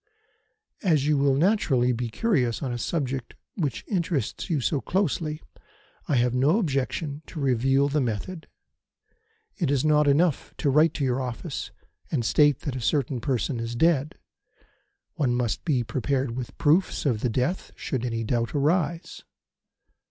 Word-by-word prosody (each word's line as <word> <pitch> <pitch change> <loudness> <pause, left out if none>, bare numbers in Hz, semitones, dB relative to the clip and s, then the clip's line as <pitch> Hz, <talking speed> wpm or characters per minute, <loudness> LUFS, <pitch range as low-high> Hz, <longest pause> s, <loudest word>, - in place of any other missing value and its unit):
As 155 - +2
you 150 0 +3
will 140 -1 +3
naturally 140 - +2
be 120 0 -2
curious 125 - 0
on 130 -3 -2
a 120 - -4
subject 135 -3 -3 0.2
which 145 - -2
interests 170 - -2
you 160 -4 +1
so 135 +2 0
closely 160 -4 -1 0.6
I 145 - +1
have 120 0 +2
no 140 +9 +3
objection 145 - -2
to 160 - -7
reveal 135 +1 +2
the 145 +1 0
method. 130 - -4 1.1
It 170 -9 0
is 140 0 +1
not 150 -1 +4
enough 150 +2 +2
to 140 - +1
write 155 +4 +4
to 145 - -2
your 130 0 0
office 130 +5 -5 0.4
and 125 -7 -1
state 145 +2 +4
that 140 -4 -4
a 130 - -4
certain 125 +1 0
person 130 -1 -1
is 115 +1 -4
dead. 155 +3 +2 1.0
One 130 -6 +1
must 120 -3 -1
be 135 -7 +1
prepared 130 +2 -1
with 125 -1 -6
proofs 165 +4 +2
of 120 -7 +1
the 125 - +1
death 130 - -1
should 130 -5 -3
any 115 -2 -2
doubt 115 +3 -1
arise. 165 +3 0
140 Hz, 155 wpm, -26 LUFS, 125-155 Hz, 1.1 s, not